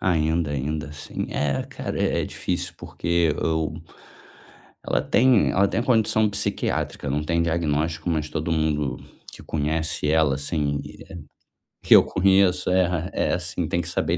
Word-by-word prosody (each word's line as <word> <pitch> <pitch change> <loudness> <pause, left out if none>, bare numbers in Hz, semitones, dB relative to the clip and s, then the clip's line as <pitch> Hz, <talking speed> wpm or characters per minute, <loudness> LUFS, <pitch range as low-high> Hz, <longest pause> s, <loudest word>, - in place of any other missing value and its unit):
Ainda, 80 -3 +1
ainda 75 +2 -3
sim. 75 - -5
É, 70 -1 0
cara - - -5
é - - +1
é - - -1
difícil 90 -1 -4
porque 85 0 -9
e 85 0 +3
eu 80 0 -1 1.0
Ela - - +1
tem 125 -4 +4
ela 100 +2 +3
tem 115 - -1
condição 110 -3 +2
psiquiátrica, 85 -7 -2
não 75 +2 0
tem 85 +1 0
diagnóstico, 80 0 -1
mas 75 -2 -1
todo 80 +1 -2
mundo 75 -5 0 0.3
que - - -12
conhece 80 0 -2
ela 80 -3 +3
assim, 70 -1 -2 0.3
eh, 85 - -9 0.7
que - - +7
eu - - +8
conheço 95 -1 +2
é, 90 -1 +1
é - - 0
assim - - -2
tem 85 - 0
que 85 - -7
saber 85 0 0
80 Hz, 155 wpm, -24 LUFS, 75-90 Hz, 1.0 s, eu